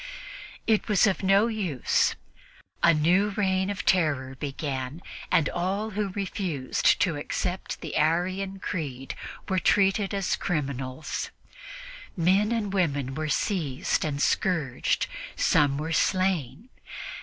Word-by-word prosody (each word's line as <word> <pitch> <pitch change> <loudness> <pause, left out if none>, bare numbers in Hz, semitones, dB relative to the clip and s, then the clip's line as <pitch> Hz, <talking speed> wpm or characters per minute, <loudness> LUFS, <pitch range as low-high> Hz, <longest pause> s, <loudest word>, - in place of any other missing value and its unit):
It 220 -2 +2
was 210 -1 +4
of 200 -3 +1
no 195 +2 +4
use; 200 - +1 0.7
a 170 - +6
new 175 +6 +3
reign 190 -1 +1
of 205 - -4
terror 145 -8 +2
began 135 +1 -4 0.3
in 165 - +5
which - - -2
all 195 +5 -2
who 210 0 -1
refused 185 -8 0
to 170 -6 +2
accept 180 +5 -3
the 160 - -5
Arian 185 +5 +1
creed 140 -9 -4 0.3
were 190 -2 +1
treated 195 +1 +3
as 195 -2 0
criminals. 140 -3 -3 0.9
Men 190 +5 +3
and 215 -4 -1
women 145 -8 0
were 155 +2 -3
seized 150 -4 0
and 145 -2 -2
scourged; 150 -5 +1 0.3
some 140 -2 +3
were 160 +3 -2
slain. 185 - 0
175 Hz, 120 wpm, -27 LUFS, 145-195 Hz, 0.9 s, a